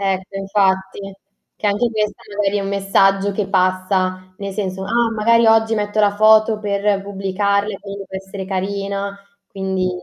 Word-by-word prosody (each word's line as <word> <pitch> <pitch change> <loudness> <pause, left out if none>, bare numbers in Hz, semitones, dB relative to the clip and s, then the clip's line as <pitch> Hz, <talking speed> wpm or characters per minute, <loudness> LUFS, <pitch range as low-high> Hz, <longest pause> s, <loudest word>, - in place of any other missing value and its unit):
Ecco, 195 0 -2
infatti. 195 0 0 0.5
Che - - -2
anche 210 +4 +1
questa 215 -1 -2
magari 205 0 +1
è - - -1
un 195 - -3
messaggio 195 0 +2
che 195 0 -2
passa, 185 0 0
nel 200 -2 -5
senso: 190 -1 -3
"Ah 235 +2 +1
magari 230 +2 +3
oggi 225 0 +4
metto 210 0 -2
la 205 -1 +3
foto 215 +1 +5
per 200 -1 0
pubblicarle, 200 +1 -1
quindi 200 0 -8
devo 190 0 -7
essere 195 0 -7
carina", 200 +1 -3 0.3
quindi 190 -1 -2
200 Hz, 155 wpm, -19 LUFS, 190-210 Hz, 0.5 s, foto